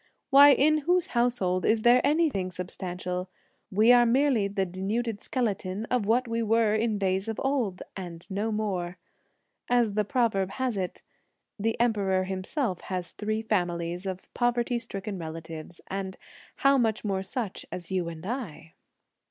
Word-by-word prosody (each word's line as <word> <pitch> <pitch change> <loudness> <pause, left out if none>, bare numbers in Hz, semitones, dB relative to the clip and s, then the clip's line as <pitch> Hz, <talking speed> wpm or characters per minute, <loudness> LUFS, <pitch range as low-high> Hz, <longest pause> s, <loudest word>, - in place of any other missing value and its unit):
Why, 280 +1 +9
in 305 +3 +4
whose 350 +4 +1
household 235 -7 +1
is 220 0 +2
there 240 +1 +6
anything 295 - +2
substantial? 180 0 -5 0.4
we 215 +4 +5
are 245 -1 +7
merely 245 -3 +3
the 195 -1 -1
denuded 205 +5 -2
skeleton 210 -4 -2
of 245 -5 +1
what 245 +3 +2
we 230 0 -1
were 225 -1 +3
in 220 0 +1
days 190 +1 0
of 225 -1 -3
old, 250 -9 0
and 175 -3 -7
no 205 +3 -2
more! 185 -5 -2 0.7
As 240 -4 +3
the 210 +1 +2
proverb 205 -4 0
has 260 -3 -1
it: 185 -2 -4 0.6
The 225 +2 -1
Emperor 200 -5 +2
himself 190 - -2
has 180 -2 -3
three 215 +1 -2
families 175 -3 -1
of 185 -1 -6
poverty 240 0 +1
stricken 200 -3 -5
relatives; 160 0 -7
and 190 0 -5 0.4
how 275 0 +4
much 220 -2 0
more 195 -2 0
such 205 +1 -4
as 180 0 -6
you 180 -3 0
and 165 0 -9
I?" 200 - -5
205 Hz, 150 wpm, -27 LUFS, 185-240 Hz, 0.7 s, Why